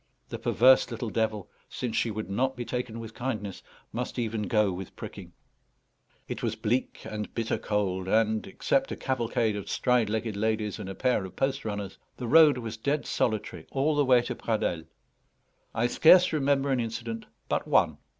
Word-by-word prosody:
The - - -5
perverse 130 +2 +5
little 115 -2 -4
devil, 110 -4 -1 0.2
since 120 -3 -4
she 115 - +1
would 110 0 -4
not 130 +7 0
be 120 -1 -5
taken 125 -2 -4
with 115 -1 -8
kindness, 110 -7 -4 0.3
must 125 +2 -4
even 110 -3 -2
go 105 -4 +3
with 95 +1 -7
pricking. - - -9 1.0
It - - -5
was - - -1
bleak 125 +4 -2
and 105 -1 -5
bitter 115 -1 -1
cold, 95 -3 -1
and, 110 +1 +2
except 270 0 0
a - - -2
cavalcade 115 -4 0
of 100 - -6
stride 125 -4 +2
legged 110 0 -2
ladies 110 0 -1
and 95 - -6
a 95 - -6
pair 125 -6 +1
of 95 - -9
post 135 -1 -1
runners, 100 -3 -4 0.2
the 125 - -5
road 150 +2 +6
was 115 -2 -5
dead 145 +6 -1
solitary 110 -2 -2
all 145 +3 +1
the 145 - +3
way 125 -2 +5
to - - -3
Pradelles. 90 -7 -2 0.9
I 115 - +1
scarce 175 +8 +6
remember 140 -2 +2
an 130 - +2
incident 115 0 -4 0.2
but - - -1
one. - - +3
115 Hz, 180 wpm, -28 LUFS, 105-130 Hz, 1.0 s, road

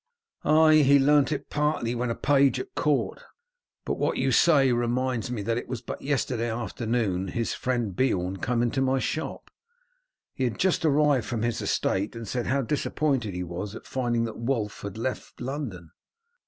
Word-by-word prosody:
"Ay, 155 +1 +6
he 140 -1 +6
learnt 145 +1 +4
it 145 - -4
partly 150 -5 0
when 120 0 -2
a 115 - -1
page 140 -1 +3
at 390 0 -7
court. - - 0 0.6
But - - -2
what - - 0
you - - +1
say 140 -6 +5
reminds 120 0 0
me 115 -4 -3
that 115 +3 0
it - - -9
was 125 -1 -5
but - - -6
yesterday 125 -4 -1
afternoon 110 -4 -1
his 115 +5 -2
friend 120 -7 -2
Beorn 95 -7 0
came 120 +3 0
into 120 +3 0
my 135 0 +2
shop. 155 +4 -4 0.8
He 130 - -3
had 115 -4 -2
just 185 -2 +1
arrived 145 -5 +3
from 115 -2 -2
his 120 -1 -1
estate, 100 +5 -1
and 115 -1 -7
said 120 +3 -2
how 135 +1 +1
disappointed 135 -5 -1
he 90 - -2
was 90 +5 -5
at - - -10
finding 120 -3 -1
that 115 -1 -5
Wulf 115 -4 -2
had 100 +1 -6
left 125 +3 -4
London. 120 - -5
120 Hz, 180 wpm, -26 LUFS, 115-140 Hz, 0.8 s, Ay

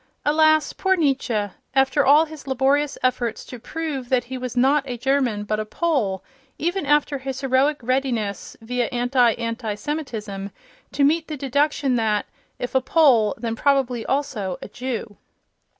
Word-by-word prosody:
Alas, 310 +1 +3
poor 380 0 +1
Nietzsche! 260 - 0 0.2
After 270 +2 +3
all 295 +4 +6
his 310 -3 -12
laborious 270 +2 +1
efforts 245 -3 -1
to 250 - -9
prove 285 -2 -5
that 255 -2 +2
he 260 +2 -7
was 255 -1 -5
not 270 +3 +4
a 245 -2 -4
German, 255 -4 0
but 215 +1 -2
a - - -1 0.2
Pole—even 270 - -2
after 295 -1 +2
his 265 0 -5
heroic 270 +2 +2
readiness, 240 -6 -2
via 245 +1 -1
anti 245 -1 +2
anti 230 -2 -3
Semitism, 215 -7 -5 0.4
to 280 - +1
meet 315 +3 +2
the 305 - -5
deduction 280 -1 +1
that, 215 -2 +1 0.3
if 245 0 -5
a 265 - +3
Pole, 255 -8 +4
then 230 -1 -3
probably 255 -3 +1
also 225 -10 -2
a - - -8
Jew! 240 -4 -5
260 Hz, 150 wpm, -22 LUFS, 235-285 Hz, 0.4 s, all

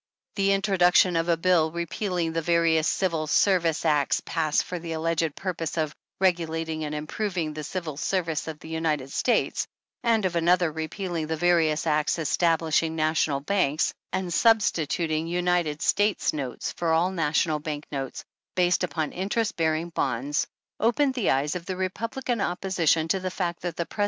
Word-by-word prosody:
The 195 -1 +2
introduction 185 -2 +4
of 165 +1 0
a 170 - +3
bill 165 -2 +3
repealing 170 0 -2
the 165 - 0
various 165 -1 +2
Civil 165 -5 0
Service 170 -2 +2
acts 150 -3 +2
passed 155 -3 +1
for 180 - -5
the 165 -1 -5
alleged 165 -1 -1
purpose 175 -4 -4
of 155 -2 0
" - - -63
regulating 165 -3 0
and 150 0 -4
improving 165 +1 -3
the 155 0 -6
Civil 160 -4 -5
Service 165 -1 -1
of 160 -2 -5
the 160 - -12
United 155 -4 -1
States," 245 - +1 0.4
and 225 -4 +2
of 180 -2 -1
another 170 0 +3
repealing 160 +1 -4
the 160 - -1
various 165 -2 +2
acts 155 0 +1
establishing 165 0 +1
National 155 -3 +1
Banks, 155 -4 +1 0.2
and 185 -2 -2
substituting 165 -7 +2
United 175 -3 0
States 205 0 +2
notes 135 -5 -4
for 170 -1 -1
all 170 +3 +3
national 155 -2 +1
bank 150 -1 -5
notes 135 -2 -4 0.3
based 180 0 +2
upon 160 -4 -2
interest 205 +4 -1
bearing 160 +1 0
bonds, 140 -2 -1 0.3
opened 260 +5 +2
the 245 -6 0
eyes 140 +3 +1
of 175 -1 -6
the 185 -1 -3
Republican 230 +5 -2
opposition 175 -4 +1
to 190 +4 +1
the 185 0 -3
fact 175 -2 -3
that 175 -2 -4
the 170 - -2
Pre. 215 - -14
165 Hz, 165 wpm, -26 LUFS, 155-185 Hz, 0.4 s, introduction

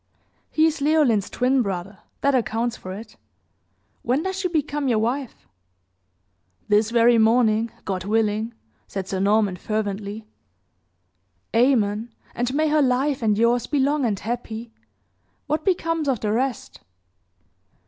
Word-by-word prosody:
"He 315 - +3
is 320 -2 +1
Leoline's 280 -9 +3
twin 255 +1 +2
brother 195 -2 -4 0.2
that 280 - +2
accounts 235 -1 0
for 185 - -9
it. 215 +3 -9 0.8
When 260 +6 0
does 380 0 -3
she 380 - 0
become 295 -4 -1
your 235 -3 +2
wife?" 245 +4 -3 1.2
"This 210 +1 +3
very 235 0 +4
morning, 225 0 +3 0.2
God 185 -2 -3
willing!" 220 +1 0 0.3
said 195 -1 -5
Sir 190 - -2
Norman, 200 -1 +2
fervently. 210 0 -3 1.3
"Amen! 230 -3 +2 0.2
And 245 +1 -1
may 310 +1 +2
her 305 0 +3
life 265 +1 +1
and 210 -2 +2
yours 235 +2 +2
be 295 - -1
long 280 +1 +2
and 210 -5 0
happy. 230 0 -5 0.7
What 305 +1 -1
becomes 330 -5 0
of 255 -5 0
the 210 0 -1
rest?" 250 +3 -2
235 Hz, 135 wpm, -23 LUFS, 215-275 Hz, 1.3 s, very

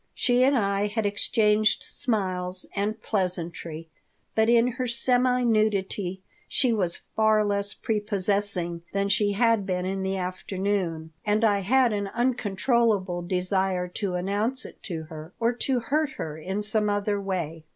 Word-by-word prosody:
She 245 -1 +3
and 275 +1 +4
I 200 -1 +1
had 215 +1 -2
exchanged 210 +1 +2
smiles 185 -6 -1
and 210 +2 -1
pleasantry, 170 -4 -3 0.5
but 220 +1 +2
in 235 0 +5
her 255 +1 -3
semi 250 +1 +2
nudity 200 -4 0 0.2
she 250 -4 +2
was 180 -6 -1
far 215 -1 +3
less 200 0 0
prepossessing 200 -4 0
than 200 0 0
she 205 0 +2
had 230 0 +3
been 180 -2 -2
in 190 +1 -2
the 190 0 -1
afternoon, 185 -3 -3
and 210 +2 +2
I 205 -2 +3
had 240 +4 +3
an 205 -1 -2
uncontrollable 225 -5 +1
desire 185 +1 0
to 195 -4 -1
announce 205 +8 -1
it - - -12
to 165 -3 -4
her, 155 +1 -10
or 235 +1 +2
to 255 +1 0
hurt 285 +5 -1
her 155 -2 -5
in 190 +6 -4
some 215 0 +1
other 205 0 0
way. 165 -5 -4
205 Hz, 150 wpm, -26 LUFS, 185-225 Hz, 0.5 s, in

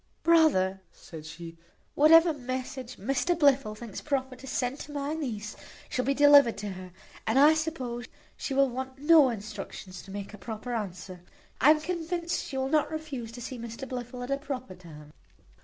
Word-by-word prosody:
"Brother," 235 - +4
said 155 -2 -11
she, 165 +1 -10 0.3
"whatever 325 +3 +6
message 255 -1 -5
Mr 270 - 0
Blifil 275 -8 +3
thinks 225 -3 -8
proper 265 -3 -2
to 270 - -11
send 255 +2 -2
to 295 - -8
my 285 +1 -3
niece 225 -9 -4 0.3
shall 255 - -1
be 275 +1 +1
delivered 285 -4 +7
to 205 0 -4
her; 185 -1 -9 0.4
and 220 +4 +2
I 295 +3 +7
suppose 265 -7 -3 0.3
she 270 - -4
will 275 0 +5
want 260 +1 -5
no 295 -1 +6
instructions 200 -4 -7
to - - -15
make 200 +1 -6
a 210 - -10
proper 220 +4 -6
answer. 185 -4 -5 0.4
I 265 - +7
am 305 0 +5
convinced 340 0 -3
she 265 - -5
will 265 0 0
not 305 +1 +2
refuse 290 -8 -5
to 245 - -8
see 255 +1 -6
Mr 235 +3 -7
Blifil 245 -1 -6
at 250 - -5
a 275 - +2
proper 270 -7 -6
time." 155 -5 -13
255 Hz, 180 wpm, -28 LUFS, 215-290 Hz, 0.4 s, delivered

